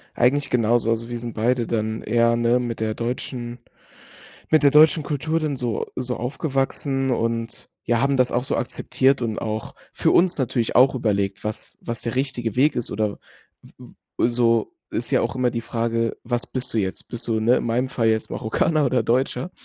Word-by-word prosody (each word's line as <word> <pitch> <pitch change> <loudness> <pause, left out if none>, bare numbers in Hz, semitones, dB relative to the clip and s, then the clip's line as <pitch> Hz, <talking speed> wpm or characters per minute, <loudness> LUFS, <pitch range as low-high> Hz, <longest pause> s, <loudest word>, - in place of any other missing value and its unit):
Eigentlich 135 +4 +2
genauso. 115 -1 +2
Also 115 +1 -1
wir 120 - -3
sind 120 -1 -6
beide 120 +2 +1
dann 110 -1 -2
eher, 115 +1 +2
ne, 120 +1 +2
mit 120 -2 -4
der 110 -1 -1
deutschen 120 0 -4 0.9
mit 155 -1 +4
der 140 - +6
deutschen 155 +2 +6
Kultur 155 +3 -1
dann 150 -4 -2
so 120 -3 -2
so 125 -1 -2
aufgewachsen 135 +1 -1
und, 115 -1 -2 0.2
ja, 120 -1 +1
haben 140 +2 +2
das 125 -1 +2
auch 125 +1 0
so - - -1
akzeptiert 130 +2 +1
und 110 -2 -2
auch 110 -1 -4 0.2
für - - +1
uns 175 -2 +3
natürlich 120 -3 -1
auch 130 +2 +6
überlegt, 100 -5 -1
was 105 0 -5
was 115 -1 -5
der 115 +1 -4
richtige 125 -4 -2
Weg 145 +4 +4
ist 120 - -3
oder 105 -1 -2 0.4
w - - -17 0.5
w - - +3
so, 115 -2 +2 0.2
ist - - -3
ja - - +3
auch 130 - -2
immer 125 -1 +2
die 115 - -3
Frage: 115 0 -1
„Was 120 0 -1
bist 125 -1 -3
du 115 - 0
jetzt? 95 -3 -3
Bist 120 0 -6
du, 110 -1 +1
ne, 120 +3 +4
in - - -1
meinem 120 +3 0
Fall 115 -3 0
jetzt 110 0 0
Marokkaner 150 +7 +1
oder 125 -2 +2
Deutscher?“ 125 +6 0
120 Hz, 195 wpm, -23 LUFS, 115-130 Hz, 0.9 s, der